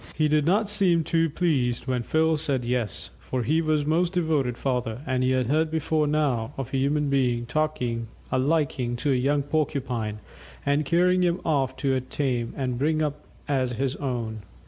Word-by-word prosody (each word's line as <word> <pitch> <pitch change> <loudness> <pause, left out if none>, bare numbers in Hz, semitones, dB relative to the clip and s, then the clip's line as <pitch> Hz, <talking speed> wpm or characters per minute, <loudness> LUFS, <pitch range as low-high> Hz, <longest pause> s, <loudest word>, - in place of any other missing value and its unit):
He 155 -1 +2
did 150 0 +2
not 205 +4 +3
seem 190 -5 +3
too 165 +1 +1
pleased 140 -7 0
when 130 -2 0
Phil 160 +6 +2
said 140 -5 -1
"Yes," 120 -3 -2
for 130 -2 -3
he 155 +7 +2
was 155 -2 +1
a - - -6
most 170 +3 +2
devoted 155 -8 0
father, 125 -3 -2
and 130 -2 0
had 130 0 +2
heard 155 +6 +1
before 155 -1 0
now 140 -5 0
of 135 -1 -5
a - - +2
human 145 +2 +1
being 125 -4 +1
taking 125 -4 -1 0.2
a 130 - +2
liking 135 -4 0
to 140 +4 0
a - - +3
young 140 +3 +1
Porcupine, 130 -7 -2 0.5
and 145 +1 +2
carrying 180 +4 +3
him 175 0 +2
off 135 -4 +1
to 130 0 +1
tame 130 -2 -2
and 125 -3 -2
bring 155 +2 +1
up 150 0 -3 0.2
as 130 -3 0
his 135 +3 -1
own. 115 -5 -3
140 Hz, 185 wpm, -25 LUFS, 125-155 Hz, 0.5 s, not